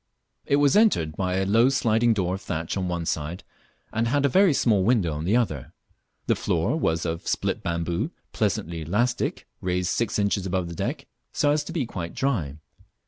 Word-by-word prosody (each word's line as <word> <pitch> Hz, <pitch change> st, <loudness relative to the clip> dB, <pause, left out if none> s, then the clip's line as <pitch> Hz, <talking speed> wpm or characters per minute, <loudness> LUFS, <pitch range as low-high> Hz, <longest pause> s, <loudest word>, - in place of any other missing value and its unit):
It 140 Hz, -, +3 dB
was 145 Hz, -1 st, +4 dB
entered 200 Hz, -, +3 dB
by 90 Hz, -1 st, -1 dB
a 95 Hz, 0 st, +1 dB
low 115 Hz, +6 st, +4 dB
sliding 120 Hz, -3 st, +2 dB
door 90 Hz, -3 st, 0 dB
of 95 Hz, -, -4 dB
thatch 80 Hz, +1 st, -3 dB
on 95 Hz, -2 st, -1 dB
one 85 Hz, -1 st, -2 dB
side, 80 Hz, +3 st, -3 dB, 0.5 s
and 115 Hz, +1 st, +1 dB
had 140 Hz, +3 st, +2 dB
a -, -, +4 dB
very 190 Hz, +5 st, +5 dB
small 110 Hz, -8 st, +2 dB
window 100 Hz, -7 st, +2 dB
on 75 Hz, +2 st, -4 dB
the 105 Hz, +7 st, +3 dB
other. 80 Hz, -, -2 dB, 0.5 s
The -, -, +3 dB
floor -, -, 0 dB
was 80 Hz, +1 st, 0 dB
of 80 Hz, 0 st, -3 dB
split -, -, -1 dB
bamboo, 85 Hz, 0 st, -2 dB, 0.2 s
pleasantly 85 Hz, 0 st, -1 dB
elastic, 120 Hz, +10 st, -1 dB, 0.2 s
raised 90 Hz, 0 st, 0 dB
six 115 Hz, -3 st, 0 dB
inches 100 Hz, -2 st, 0 dB
above 90 Hz, -2 st, -1 dB
the -, -, -6 dB
deck, -, -, -3 dB, 0.3 s
so 145 Hz, -, +2 dB
as 150 Hz, 0 st, +1 dB
to -, -, -6 dB
be 165 Hz, -6 st, -1 dB
quite 85 Hz, -6 st, -6 dB
dry. 95 Hz, -, -1 dB
95 Hz, 195 wpm, -25 LUFS, 85-120 Hz, 0.5 s, very